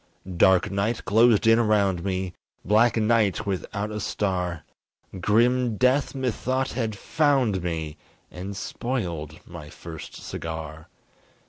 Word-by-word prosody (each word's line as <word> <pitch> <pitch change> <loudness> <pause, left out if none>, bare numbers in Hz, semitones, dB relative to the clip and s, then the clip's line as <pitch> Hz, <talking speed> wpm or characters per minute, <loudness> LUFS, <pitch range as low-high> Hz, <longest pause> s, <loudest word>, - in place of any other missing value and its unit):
Dark 95 +2 +4
night 105 +4 -1
closed 110 +3 +4
in 115 +1 +6
around 100 -6 +2
me 95 -2 -2 0.3
Black 115 +3 +4
night, 110 -1 +2
without 100 +2 -3
a 105 - -4
star 90 -5 -2 0.6
Grim 120 +4 +2
death 130 +4 +2
methought 130 0 -1
had 115 -4 -3
found 135 - +1
me 80 -3 -4 0.3
And 95 +2 -7
spoiled 85 - -4
my 75 0 -9
first 80 0 -9
cigar. 80 -1 -7
105 Hz, 115 wpm, -25 LUFS, 90-115 Hz, 0.6 s, in